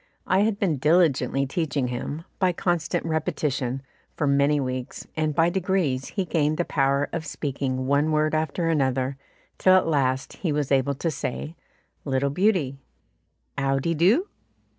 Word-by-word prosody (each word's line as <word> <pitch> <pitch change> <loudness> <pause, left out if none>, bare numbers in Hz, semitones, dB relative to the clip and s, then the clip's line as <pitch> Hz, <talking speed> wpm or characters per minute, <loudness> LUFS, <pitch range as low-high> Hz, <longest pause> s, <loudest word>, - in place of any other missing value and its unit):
I 185 - +2
had 210 0 +2
been 180 -8 0
diligently 150 -2 +2
teaching 140 -3 -1
him, 145 +6 -5
by 185 -2 +2
constant 175 -2 -1
repetition, 150 -5 -1 0.3
for 150 - -1
many 140 +1 +3
weeks, 130 -2 -4
and 155 -2 0
by 165 +2 +3
degrees 175 -8 0
he 195 -3 -2
gained 155 -3 +1
the 175 - 0
power 140 0 +1
of 165 -2 -2
speaking 135 -4 -3
one 140 +3 +2
word 155 0 +1
after 160 +2 0
another, 135 -4 0 0.4
till 185 0 +6
at 185 - +4
last 135 -4 0
he 170 - -1
was 145 -2 -1
able 135 +1 +2
to 165 +4 -1
say, 150 +3 -4 0.5
"Little 140 0 0
beauty," 160 -6 +1 0.8
"'Ow 135 0 +1
de 165 +5 0
doo?" 200 - +3
150 Hz, 155 wpm, -25 LUFS, 135-170 Hz, 0.8 s, till